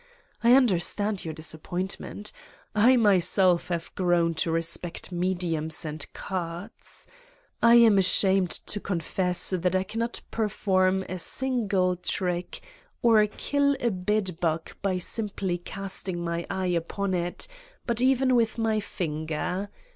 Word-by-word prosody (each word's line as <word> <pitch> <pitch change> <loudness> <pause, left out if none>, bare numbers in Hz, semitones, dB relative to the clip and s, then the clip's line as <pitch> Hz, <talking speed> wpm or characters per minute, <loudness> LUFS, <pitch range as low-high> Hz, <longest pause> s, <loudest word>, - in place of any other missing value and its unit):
I 235 +1 +6
understand 205 -3 +1
your 160 - -5
disappointment. 180 +6 -5 0.4
I 230 +5 +5
myself 185 -4 +4
have 170 -2 -4
grown 175 -2 +1
to - - 0
respect 165 +2 -3
mediums 175 -3 -2
and 155 -1 -5
cards. 180 +2 -7 0.6
I 235 0 +6
am 225 -4 +6
ashamed 190 0 +3
to 205 - 0
confess 180 -1 +1
that 180 0 0
I 185 - +2
cannot 230 +4 -4
perform 190 -3 +1
a 185 -1 -6
single 200 -6 +1
trick 180 0 -3 0.4
or 220 -3 +5
kill 280 +5 0
a 235 - 0
bedbug 180 -4 -1
by 190 -2 0
simply 190 -2 -2
casting 190 -1 -4
my 170 0 -3
eye 190 0 -2
upon 185 +3 -2
it, 175 - -2 0.4
but 235 -1 0
even 260 0 +3
with 230 -2 +2
my 220 -1 +1
finger. 175 +1 -3
185 Hz, 125 wpm, -26 LUFS, 175-210 Hz, 0.6 s, I